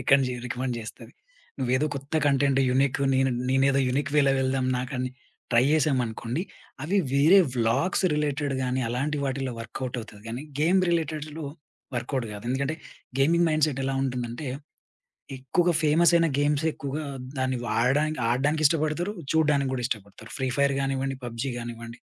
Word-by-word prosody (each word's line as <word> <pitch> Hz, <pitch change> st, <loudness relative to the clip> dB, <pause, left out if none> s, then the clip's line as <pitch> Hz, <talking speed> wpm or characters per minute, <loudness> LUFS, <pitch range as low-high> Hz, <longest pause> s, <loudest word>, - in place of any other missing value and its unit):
Reckoned 135 Hz, +2 st, +4 dB
జే 125 Hz, -, -3 dB
recommend 125 Hz, +1 st, -2 dB
జేస్తది. 110 Hz, -1 st, -9 dB, 0.5 s
ను‌వ్వేదో 130 Hz, +3 st, +1 dB
కొత్త 140 Hz, +2 st, -8 dB
కంటెంట్ 140 Hz, -1 st, +3 dB
యూనిక్ 135 Hz, +1 st, +2 dB
నేను 135 Hz, 0 st, +3 dB, 0.2 s
నేనేదో 135 Hz, +1 st, +3 dB
యూనిక్ 140 Hz, +3 st, -1 dB
వేలో 140 Hz, -2 st, +5 dB
వెళ్దాం 130 Hz, 0 st, 0 dB
నాకని 130 Hz, 0 st, -3 dB, 0.4 s
ట్రై 120 Hz, 0 st, +5 dB
జేశామనుకోండి, 130 Hz, -2 st, 0 dB, 0.4 s
అవి 185 Hz, +7 st, 0 dB, 0.2 s
వేరే 155 Hz, +8 st, +6 dB, 0.2 s
వ్లా‌గ్స్ 120 Hz, +12 st, +1 dB
రిలేటెడ్ 145 Hz, -1 st, -1 dB
గాని 130 Hz, +1 st, 0 dB
అలాంటి 140 Hz, +5 st, -1 dB
వాటిలో 135 Hz, -1 st, -2 dB
వర్క్‌అవుట్ 125 Hz, +2 st, -5 dB
అవుతది 105 Hz, -2 st, -12 dB
గానీ, 120 Hz, +4 st, -5 dB, 0.2 s
గేమ్ 180 Hz, +5 st, +4 dB
రిలేటెడ్‌లో 155 Hz, -2 st, -2 dB, 0.5 s
వర్క్‌అవుట్ 120 Hz, 0 st, -2 dB
గాదు. 105 Hz, +2 st, -8 dB
ఎందుకంటే 140 Hz, +4 st, -1 dB, 0.4 s
గేమింగ్ 170 Hz, +4 st, +4 dB
మైండ్‌సెట్ 155 Hz, -3 st, +1 dB
ఎలా 135 Hz, 0 st, -1 dB
ఉంటుందంటే 125 Hz, +1 st, -3 dB, 0.9 s
ఎక్కువగా 170 Hz, +7 st, +1 dB
ఫేమసయిన 165 Hz, +2 st, +4 dB
గేమ్సె 145 Hz, +2 st, +1 dB
ఎక్కువగా 145 Hz, +2 st, -4 dB, 0.3 s
దాన్ని 130 Hz, 0 st, 0 dB
వాడడానికి, 135 Hz, +8 st, +1 dB
ఆడడానికి, 145 Hz, +6 st, +1 dB
ఇష్టబడుతరు. 160 Hz, +5 st, 0 dB, 0.2 s
చూడ్డానికి 145 Hz, -4 st, +2 dB
గూడా 125 Hz, -2 st, -2 dB
ఇష్టపడుతరు. 110 Hz, -1 st, -6 dB
ఫ్రీ 130 Hz, -1 st, 0 dB
ఫైర్ 140 Hz, 0 st, +3 dB
గానివ్వండి, 135 Hz, 0 st, -1 dB
పబ్‌జీ 120 Hz, +3 st, -3 dB
గానివ్వండి. 115 Hz, 0 st, -7 dB
135 Hz, 140 wpm, -26 LUFS, 125-150 Hz, 0.9 s, వేరే